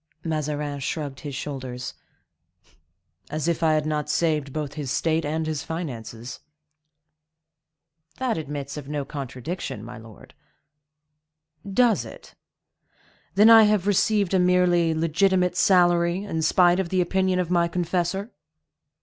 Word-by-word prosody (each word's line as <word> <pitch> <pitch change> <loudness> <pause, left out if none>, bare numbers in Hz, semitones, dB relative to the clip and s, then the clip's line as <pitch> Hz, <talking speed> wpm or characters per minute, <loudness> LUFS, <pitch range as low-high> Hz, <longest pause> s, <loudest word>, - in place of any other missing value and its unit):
Mazarin 150 -2 -3
shrugged 140 0 -4
his 145 -3 -6
shoulders. 130 -3 -5 1.4
"As 155 +2 -3
if 170 0 0
I 160 -1 +3
had 155 -1 +1
not 150 -1 -2
saved 150 -4 0
both 150 -1 -4
his 145 -4 -5
state 160 +4 0
and 155 +2 -2
his 155 -2 -2
finances." 125 -8 -6 1.8
"That 255 -3 -1
admits 145 -2 -5
of 145 -1 -8
no 145 -2 -3
contradiction, 135 - -6
my 120 +1 -9
lord." 110 -2 -15 1.4
"Does 235 +1 +3
it? - - -12 1.0
Then 210 +3 +7
I 225 -1 +9
have 210 -3 +2
received 205 -1 +2
a 190 - +4
merely 180 -2 +3
legitimate 180 +3 +2
salary, 175 0 +3
in 165 -6 -3
spite 175 +2 +4
of 185 -3 -2
the 185 - 0
opinion 185 +1 +1
of 180 -1 -1
my 170 -1 +3
confessor?" 180 +4 -2
160 Hz, 130 wpm, -24 LUFS, 145-180 Hz, 1.8 s, I